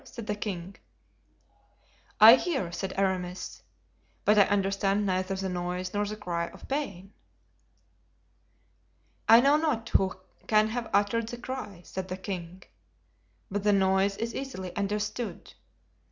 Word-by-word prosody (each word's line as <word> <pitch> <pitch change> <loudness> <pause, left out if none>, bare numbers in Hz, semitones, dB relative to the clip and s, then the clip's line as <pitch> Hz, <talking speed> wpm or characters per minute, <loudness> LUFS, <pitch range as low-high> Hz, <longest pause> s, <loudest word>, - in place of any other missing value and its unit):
said 230 -3 -9
the 210 - -1
king. 195 -2 -5 1.4
"I 220 +2 +11
hear," 260 - 0
said 190 +2 -4
Aramis, 185 -2 -2 0.6
"but 210 - +5
I 205 -2 +7
understand 195 0 +1
neither 185 0 0
the 190 0 -3
noise 180 0 -3
nor 205 0 0
the 210 - -4
cry 170 -4 -3
of - - -13
pain." 200 -9 -4 2.2
"I 230 +1 +9
know 280 +3 +5
not 275 -8 -1
who 190 -1 +2 0.3
can 215 0 +4
have 235 0 -4
uttered 205 +3 +1
the 240 - -6
cry," 240 -8 -7
said 190 0 -5
the 185 0 -5
king, 185 -2 -6 0.9
"but 205 +1 -1
the 205 +1 +3
noise 195 +1 +2
is 230 +1 -3
easily 190 -10 -6
understood. 210 +3 -3
200 Hz, 135 wpm, -28 LUFS, 185-220 Hz, 2.2 s, I